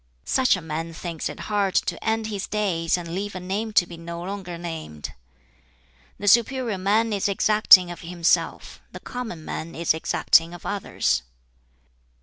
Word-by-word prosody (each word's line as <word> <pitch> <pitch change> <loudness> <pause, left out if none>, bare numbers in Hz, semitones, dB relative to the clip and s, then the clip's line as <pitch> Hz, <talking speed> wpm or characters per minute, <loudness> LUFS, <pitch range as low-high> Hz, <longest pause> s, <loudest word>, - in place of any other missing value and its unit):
"Such 255 -4 +3
a 185 - -7
man 165 +1 -4
thinks 165 -1 -4
it - - -8
hard 205 -3 0
to - - 0
end 225 0 0
his 205 -3 -4
days 185 -6 0
and 170 -1 -6
leave 200 +2 -4
a - - -4
name 200 +5 -3
to 185 - +5
be 170 -1 -10
no 170 0 -7
longer 185 -2 -6
named. 160 - -7 1.0
"The 205 - -5
superior 235 -1 +3
man 215 +4 +2
is 200 -1 0
exacting 200 -3 +6
of 175 - -9
himself; 170 -1 0
the - - -8
common 225 -11 -6
man 165 +1 -5
is 165 0 +2
exacting 165 +1 +2
of 175 - -13
others. 200 - 0
185 Hz, 160 wpm, -24 LUFS, 170-210 Hz, 1.0 s, exacting